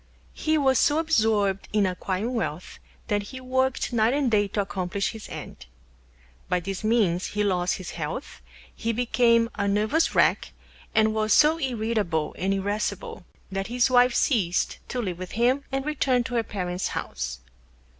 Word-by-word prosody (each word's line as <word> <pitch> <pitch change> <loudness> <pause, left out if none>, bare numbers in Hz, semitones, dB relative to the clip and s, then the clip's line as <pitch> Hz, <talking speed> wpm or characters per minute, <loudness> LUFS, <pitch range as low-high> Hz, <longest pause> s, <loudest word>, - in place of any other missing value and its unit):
He 315 0 0
was 265 -3 +3
so 295 - +3
absorbed 220 - +1
in 210 -1 +2
Acquiring 190 +5 -2
Wealth 185 -8 -4 0.3
that 205 0 +1
he 260 +6 -8
Worked 260 0 0
Night 230 +2 +3
and 280 -4 +1
Day 205 -1 +3
to 205 +1 -1
Accomplish 195 0 -2
his 220 -2 -10
End. 70 - -9 0.8
By 180 0 +2
this 195 +3 -5
Means 210 -6 +2
he 210 0 -1
lost 180 -3 +1
his 185 - -7
Health, 165 - -6 0.3
he 230 0 -2
became 230 -1 +3
a 200 -1 -1
Nervous 215 +11 +1
Wreck, - - +2 0.4
and 215 0 +4
was 215 0 +1
so 310 +2 +5
Irritable 220 - -1
and 190 +1 0
Irascible 200 -1 -3 0.3
that 195 0 -3
his 245 +2 +1
Wife 245 -1 +5
Ceased 190 - +1
to 255 - -3
live 180 -4 -4
with 185 -1 -7
him 250 +5 +2
and 270 0 -2
Returned 260 -5 +1
to 260 - -5
her 235 - +2
Parents' 180 -3 -3
House. 60 +1 -4
215 Hz, 165 wpm, -25 LUFS, 190-250 Hz, 0.8 s, so